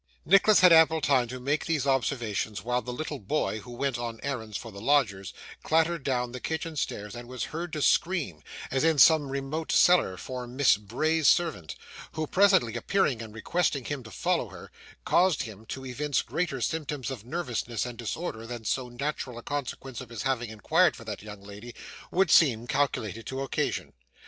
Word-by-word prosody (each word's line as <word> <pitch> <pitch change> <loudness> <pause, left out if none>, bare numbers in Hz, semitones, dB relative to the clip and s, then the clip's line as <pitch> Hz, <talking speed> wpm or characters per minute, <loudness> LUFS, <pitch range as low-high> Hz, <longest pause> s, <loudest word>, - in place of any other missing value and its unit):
Nicholas 195 +2 +6
had 180 -2 +8
ample 160 0 +6
time 135 -5 +2
to 130 +2 -7
make 145 +4 -1
these 155 -5 0
observations 115 -7 -1
while 125 +1 0
the 125 - -6
little 145 +2 -5
boy, 110 0 -1
who 110 - -13
went 120 0 -2
on 115 -2 -5
errands 115 -7 -3
for 115 - -9
the 100 0 -10
lodgers, 110 -8 +1 0.3
clattered 165 0 +1
down 125 -2 -1
the 125 - -6
kitchen 160 +3 -4
stairs 105 -7 -3
and 120 0 -8
was 125 0 -5
heard 170 +2 -4
to 150 -1 -2
scream, 155 - +1 0.3
as 135 +1 +1
in 160 -1 +3
some 150 -1 +6
remote 140 +4 -3
cellar, 175 - +4
for 125 +2 -6
Miss 130 +3 +4
Bray's 155 +10 0
servant, 95 - +2 0.4
who, 155 0 -2
presently 185 - +3
appearing 150 - +1
and 110 -1 -8
requesting 140 +4 -1
him 145 -2 -3
to 115 - -12
follow - - -1
her, - - -12 0.3
caused 180 -3 +3
him 110 0 -10
to 130 +3 -6
evince 140 +3 -1
greater 160 -7 -2
symptoms 145 -2 -2
of 120 -6 -7
nervousness 120 -5 -3
and 120 -1 -7
disorder 115 -1 -4
than 120 -2 -7
so 125 +2 -1
natural 125 -1 -4
a 120 - -9
consequence 135 -3 -5
of 125 - -10
his 115 -2 -5
having 125 -3 -1
inquired 110 -2 +2
for - - -11
that - - -6
young 105 -1 -10
lady 105 +4 -10 0.3
would 185 -2 +2
seem 120 -8 +5
calculated 115 -6 -1
to 135 0 -4
occasion. 135 - -2
130 Hz, 185 wpm, -28 LUFS, 115-155 Hz, 0.4 s, had